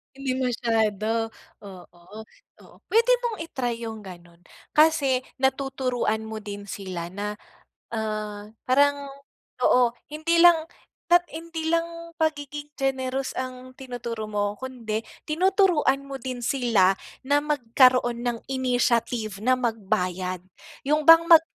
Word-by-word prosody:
Hindi 265 -1 -2
masyado? 225 -3 0 0.3
Oo, 180 -3 -13 0.6
oo. - - -18
Pwede 460 +3 +3
mong 460 -3 -2
i-try 240 -3 -3
yung 220 -2 -6
ganun. 175 -2 -12 0.3
Kasi 290 -5 +3 0.2
natuturuan 265 -4 0
mo 220 0 -6
din 205 -1 -8
sila 185 -4 -5
na, 205 +3 -4 0.6
ah, 215 -2 -4 0.2
parang 285 +1 +3 0.6
oo. 250 -1 +5 0.2
Hindi 315 +2 0
lang 335 -1 +6 0.4
at 350 0 +5
hindi 325 0 -4
lang 335 0 -2
pagiging 295 -2 -2
generous 265 -1 -1
ang 255 0 -6
tinuturo 240 -4 -6
mo 205 -1 -1
kundi 235 -5 -4 0.2
tinuturuan 340 -5 +2
mo 275 -1 -7
din 245 -1 -5
sila 230 -8 +3 0.3
na 285 +2 +3
magkaroon 255 -4 +3
ng 240 -1 -2
initiative 240 -5 0
na 255 +4 +3
magbayad. 185 -6 -2 0.4
Yun 300 +3 +1
bang 330 0 +9
mag 335 -2 +8
255 Hz, 115 wpm, -25 LUFS, 220-290 Hz, 0.6 s, bang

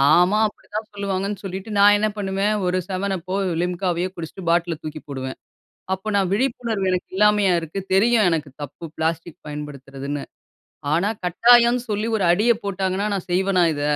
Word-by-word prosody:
ஆமா, 180 +5 +4
அப்படிதான் 215 +1 -7
சொல்லுவாங்கன்னு 200 0 -3
சொல்லிட்டு 190 +3 -6
நான் 205 +1 +7
என்ன 215 - +2
பண்ணுவேன்? 195 +1 0
ஒரு 180 +1 +1
7up 190 -2 -2
போ, 190 - 0 0.3
Limca 180 +1 -1
வையோ 180 +2 -1
குடிச்சுட்டு 175 +2 -7
பாட்டில 170 -1 +1
தூக்கி 155 0 -6
போடுவேன். 130 -2 -5 0.6
அப்போ 190 +3 -7
நான் 195 -2 +1
விழிப்புணர்வு, 230 -4 -1
எனக்கு 180 - -2
இல்லாமையா 210 -1 +4
இருக்கு? 165 +4 -5
தெரியும் 220 +2 +4
எனக்கு 155 -3 -1
தப்பு, 145 +4 -8
பிளாஸ்டிக் 165 +1 -2
பயன்படுத்துறதுன்னு. 140 -1 -6 0.7
ஆனா 175 +6 +2 0.2
கட்டாயம்னு 235 +6 +5
சொல்லி 210 +1 -1
ஒரு 195 - +1
அடிய 210 +7 +4
போட்டாங்கன்னா, 195 +1 -1
நான் 190 -2 -5
செய்வனா 185 0 +3
இத? 145 - -4
190 Hz, 155 wpm, -22 LUFS, 170-205 Hz, 0.7 s, நான்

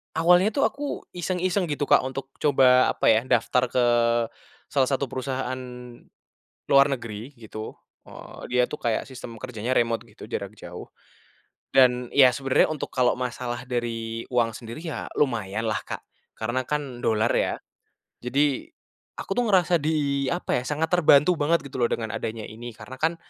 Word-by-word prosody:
awalnya 175 +4 +5
tuh, 280 - +2
aku 285 0 -5
iseng-iseng 180 +1 -1
gitu, 145 -1 -2
Kak, - - +4
untuk 135 +1 -6
coba 130 -3 +5
apa - - -1
ya, 115 +3 +2
daftar 125 +2 +2
ke 125 0 +1 0.9
salah 135 -2 +3
satu 135 -2 -1
perusahaan 130 -1 -3 1.1
luar 140 0 +6
negeri, 120 +1 -5
gitu. 110 -1 -8 0.3
E - - -17 0.4
dia 125 0 +3
tuh, 150 - -8
kayak 115 -3 0
sistem 125 -3 -9
kerjanya 125 +1 -3
remote 115 -1 +1
gitu - - -12
jarak - - -5
jauh - - -9 0.9
dan 125 -1 +5
ya, 135 -2 +8
sebenernya 135 0 +2
untuk 155 - -4
kalau 125 -2 +3
masalah 125 -1 -4
dari 115 -2 -3
uang 120 -2 +2
sendiri 115 +3 -8
ya, 160 - -5
lumayan 110 -5 0
lah, 110 - 0
Kak, - - -6 0.4
karena 120 +4 -1
kan 140 -5 -3
dolar 110 +1 +2
ya. - - +1 0.7
Jadi 135 +2 +1 0.6
aku - - -4
tuh, 245 - +3
ngerasa 180 -3 +4
di 145 -3 0
apa 175 -7 -1
ya, - - -7
sangat 150 +3 -1
terbantu 170 -1 +5
banget 165 +3 +2
gitu 140 - -8
loh, 120 - +3
dengan 110 -2 -3
adanya 110 -1 -4
ini, 120 +2 -8
karena 130 - -10
kan, 165 +2 +1
130 Hz, 160 wpm, -25 LUFS, 120-145 Hz, 1.1 s, ya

